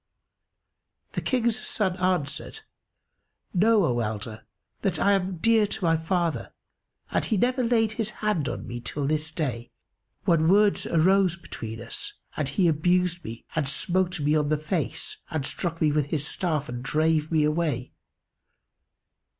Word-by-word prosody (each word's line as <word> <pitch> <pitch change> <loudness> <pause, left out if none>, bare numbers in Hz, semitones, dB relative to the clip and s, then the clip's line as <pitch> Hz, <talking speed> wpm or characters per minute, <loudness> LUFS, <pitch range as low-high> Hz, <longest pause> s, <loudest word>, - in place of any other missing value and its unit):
The - - -3
King's 235 -3 +1
son 190 -4 0
answered, 185 - -1 0.9
"Know, 210 +1 +4
O 120 -5 +1
elder, 110 0 -4 0.3
that - - 0
I 200 - +3
am 190 -2 +1
dear 225 +3 +4
to 200 - -5
my 165 -1 +4
father 170 0 -1 0.6
and - - +1
he 220 - 0
never 250 +4 +2
laid 225 -2 +2
his 215 -1 -2
hand 195 - -1
on - - -5
me 120 - -5
till 140 +4 -3
this 155 +2 0
day, 125 -8 -3 0.6
when 160 -2 +3
words 205 +3 +4
arose 180 +1 +3
between 115 -9 -7
us 115 - -6 0.2
and 145 -3 -1
he 175 +5 +2
abused 175 +2 +2
me 115 +1 -8
and 155 -3 0
smote 180 +4 0
me 150 +1 +2
on 150 -1 +1
the 155 - +2
face 155 +2 -3
and 155 -4 -2
struck 165 +2 -3
me 155 -2 +3
with 145 -1 +1
his 150 -1 -1
staff 155 -6 -1
and 120 0 -5
drave 155 +3 +1
me 155 -2 +3
away. 150 -5 0
165 Hz, 155 wpm, -26 LUFS, 150-190 Hz, 0.9 s, Know